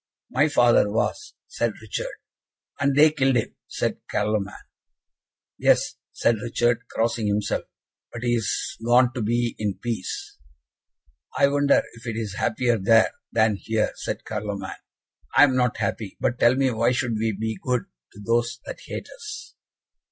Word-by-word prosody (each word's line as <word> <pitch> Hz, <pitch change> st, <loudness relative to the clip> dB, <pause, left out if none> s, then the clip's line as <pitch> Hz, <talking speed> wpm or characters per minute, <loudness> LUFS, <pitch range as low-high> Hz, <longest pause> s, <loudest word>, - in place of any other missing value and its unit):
"My 145 Hz, +4 st, +3 dB
father 120 Hz, -7 st, +4 dB
was," 420 Hz, -, -2 dB
said -, -, -1 dB
Richard. -, -, -5 dB, 0.6 s
"And 140 Hz, -2 st, +2 dB
they 150 Hz, +2 st, +7 dB
killed 135 Hz, -3 st, +2 dB
him!" 115 Hz, -, 0 dB
said -, -, -2 dB
Carloman. 105 Hz, -1 st, -1 dB, 1.0 s
"Yes," -, -, +3 dB
said 115 Hz, -1 st, +2 dB
Richard, 120 Hz, 0 st, 0 dB
crossing 115 Hz, -1 st, 0 dB
himself, 105 Hz, 0 st, 0 dB, 0.5 s
"but 120 Hz, -, -7 dB
he 120 Hz, -, +1 dB
is 115 Hz, -4 st, -1 dB
gone 120 Hz, +1 st, +4 dB
to 125 Hz, -, -3 dB
be 120 Hz, +2 st, 0 dB
in 105 Hz, -3 st, -1 dB
peace." 115 Hz, -5 st, -5 dB, 1.0 s
"I 140 Hz, -, +5 dB
wonder 145 Hz, 0 st, +3 dB
if 115 Hz, +1 st, -12 dB
it 115 Hz, -, -2 dB
is 110 Hz, -4 st, -3 dB
happier 115 Hz, +2 st, +1 dB
there, 110 Hz, +4 st, +5 dB, 0.2 s
than 110 Hz, -2 st, +3 dB
here," 110 Hz, +1 st, 0 dB
said -, -, -5 dB
Carloman. 105 Hz, -2 st, -4 dB, 0.6 s
"I 140 Hz, -, +9 dB
am 135 Hz, -3 st, +4 dB
not 125 Hz, -1 st, +1 dB
happy. 105 Hz, -4 st, -3 dB
But 125 Hz, -, 0 dB
tell 120 Hz, +2 st, +5 dB
me 135 Hz, -1 st, +2 dB
why 115 Hz, +2 st, +2 dB
should 125 Hz, -2 st, -1 dB
we 110 Hz, 0 st, +1 dB
be 110 Hz, -2 st, -2 dB
good 125 Hz, -4 st, 0 dB, 0.3 s
to 100 Hz, -, -13 dB
those 115 Hz, +2 st, 0 dB
that -, -, -7 dB
hate -, -, -5 dB
us?" 460 Hz, -1 st, -8 dB
120 Hz, 155 wpm, -24 LUFS, 110-125 Hz, 1.0 s, I